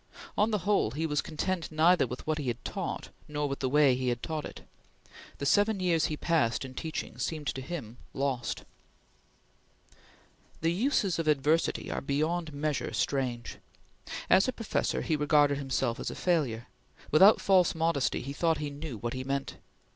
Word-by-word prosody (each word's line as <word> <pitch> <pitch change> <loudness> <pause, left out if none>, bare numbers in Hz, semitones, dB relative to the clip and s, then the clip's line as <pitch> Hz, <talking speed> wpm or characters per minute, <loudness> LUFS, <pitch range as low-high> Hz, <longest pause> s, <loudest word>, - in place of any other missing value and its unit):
On 210 +2 +3
the 215 - +1
whole, 200 - +3
he 150 +8 -3
was 150 -2 0
content 170 +2 -3
neither 160 0 +4
with 125 +2 -7
what 155 0 0
he 140 - -4
had 120 - -3
taught - - -4 0.2
nor 150 -1 -2
with 140 0 -4
the 130 - 0
way 145 -1 +5
he 130 0 -2
had 120 0 -2
taught 155 -2 -3
it. - - -9 0.8
The 140 - -4
seven 205 +6 +3
years 170 -4 +2
he 155 - -3
passed 140 -8 +1
in 130 - -9
teaching 160 +4 -5
seemed 155 -2 -3
to 135 - -5
him 130 -6 -6
lost. 135 -3 -2 2.0
The 165 +1 +2
uses 200 - +1
of 165 - -1
adversity 150 +2 +1
are - - -2
beyond 155 +4 -1
measure 145 0 -2
strange. 125 -4 -2 0.7
As 190 - +5
a - - +1
professor, 225 -2 -1
he 160 - +1
regarded 145 -1 +3
himself 130 -4 -1
as - - -3
a - - -6
failure. 135 -10 0 0.5
Without 190 +8 +7
false 185 -4 +3
modesty 160 -4 0
he 135 +2 -5
thought 165 +2 +1
he 150 -1 -4
knew 145 -4 -6
what 120 +3 -4
he 130 0 -4
meant. 135 +1 -3
150 Hz, 175 wpm, -29 LUFS, 135-165 Hz, 2.0 s, Without